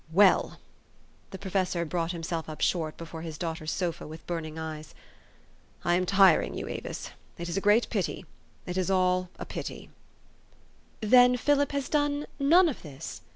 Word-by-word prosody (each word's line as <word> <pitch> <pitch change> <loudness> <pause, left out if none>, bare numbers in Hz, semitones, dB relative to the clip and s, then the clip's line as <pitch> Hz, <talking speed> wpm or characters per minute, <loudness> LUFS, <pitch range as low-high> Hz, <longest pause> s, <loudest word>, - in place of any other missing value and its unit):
Well" 190 +2 +4 0.7
the 190 - -7
professor 185 -3 -1
brought 170 +1 -1
himself 165 -1 -4
up 155 - -7
short 160 -3 0
before 165 -1 -8
his 160 -2 -6
daughter's 160 -2 -4
sofa 170 -2 -2
with 160 +1 -10
burning 160 -2 -4
eyes 155 -1 -7 0.5
" - - -30
I 175 - +3
am 180 +1 +1
tiring 195 -3 +4
you, - - -4
Avis. - - -6 0.3
It 170 - -5
is 170 - -3
a 195 - 0
great 210 +4 +4
pity: 195 -3 -2 0.4
it 180 +1 -2
is 185 - 0
all 185 -1 +2
a - - -6
pit}^." - - -6 1.1
"Then 250 +3 +6
Philip 285 +2 +2
has 280 -2 -1
done 290 0 0
none 335 +6 +6
of 295 - -3
this?" 150 0 -8
180 Hz, 165 wpm, -28 LUFS, 165-205 Hz, 1.1 s, Then